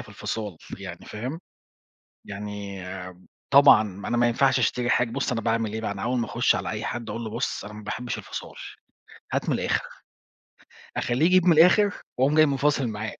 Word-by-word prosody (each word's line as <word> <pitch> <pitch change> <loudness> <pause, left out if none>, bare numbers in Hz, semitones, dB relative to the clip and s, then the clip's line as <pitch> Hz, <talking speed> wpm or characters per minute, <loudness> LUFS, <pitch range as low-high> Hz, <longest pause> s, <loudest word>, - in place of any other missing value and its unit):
في - - -11
الفِصال 105 -6 -5 0.2
يعني، - - -9
فاهم؟ 130 +10 -5 0.9
يعني 100 -1 -6
آآ 90 0 -6 0.5
طبعًا 140 -5 +8 0.3
أنا 120 - 0
ما 120 0 +4
ينفعش 130 +2 +3
أشتري 125 0 0
حاج 125 -2 +2
بُص 140 +1 -2
أنا 115 - -1
باعمل 115 -1 0
إيه 110 - -3
بقى، 110 - -2
أنا 100 -1 -7
أول 125 +1 0
ما 115 - -1
أخُش - - +2
على - - -3
أي - - -4
حدّ 120 -1 -4
أقول 115 0 -4
له 110 - -5
"بُصُ 120 +3 -3
أنا 105 - -9
ما 105 0 -10
باحبش 120 +3 -4
الفصال - - -8 0.8
هات - - -1
من - - +2
الآخر." - - 0 1.2
أخلّيه 125 +7 +1
يجيب 185 0 +4
من 175 - +7
الآخر 185 +6 +5 0.2
وأقوم 135 +4 +3
جاي 155 0 +6
مفاصِل 140 -1 +1
معاه. 110 0 -5
120 Hz, 190 wpm, -25 LUFS, 105-140 Hz, 1.2 s, طبعًا